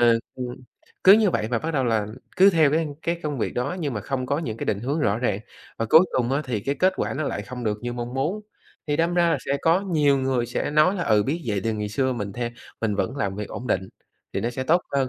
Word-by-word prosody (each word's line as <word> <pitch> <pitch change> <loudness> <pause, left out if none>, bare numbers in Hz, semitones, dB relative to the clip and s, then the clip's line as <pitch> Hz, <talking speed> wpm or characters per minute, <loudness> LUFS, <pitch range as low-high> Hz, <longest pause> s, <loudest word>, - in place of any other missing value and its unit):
ờ, 120 -1 +5 0.2
ừm, 125 -1 -5 0.5
cứ 190 - +10
như 210 -1 +5
vậy 110 - -1
và 120 - +1
bắt 160 - -3
đầu 135 -2 +2
là 110 -3 +1 0.3
cứ 195 +2 +7
theo 160 -5 +4
cái 160 +2 +1 0.2
cái 170 0 -1
công 150 -3 -3
việc - - -2
đó 140 +8 -2
nhưng 145 -5 -2
mà 105 - -2
không 130 +4 -3
có 140 +3 0
những 115 -9 -4
cái - - -4
định 100 -1 0
hướng 140 +6 -1
rõ 105 -5 +1
ràng, 105 -5 0 0.4
và 115 - -1
cuối 160 - +9 0.2
cùng 125 0 +1
á 140 +3 +1
thì 120 -5 -2
cái 140 +7 -1
kết 185 +5 +3
quả - - -2
nó 145 - -2
lại 105 - -3
không 125 +3 -7
được 105 -1 -1
như 120 0 -3
mong 120 +1 -5
muốn. 155 +11 -1 0.5
Thì 145 -1 0
đâm 165 +2 +1
ra 170 -1 +3
là - - +2
sẽ 140 - +1
có 165 +4 +4
nhiều 150 -8 +2
người 130 -2 0
sẽ 120 - -2
nói 155 +6 +4
là, 180 - -2
ừ, 105 -2 +4
biết 160 +9 -2
vậy 105 -3 0
thì 115 - +1
ngày 105 -1 -3
xưa 130 +5 0
mình 105 -5 -4
the 120 +2 -3 0.3
mình 110 -2 0
vẫn 100 +7 -2
làm 100 -6 -2
việc 105 0 -5
ổn 125 - -6
định 95 -3 0 0.4
thì - - -1
nó 120 - -1
sẽ 125 +2 -4
tốt 170 +6 +3
hơn. 135 -2 +1
130 Hz, 280 wpm, -24 LUFS, 115-155 Hz, 0.5 s, cứ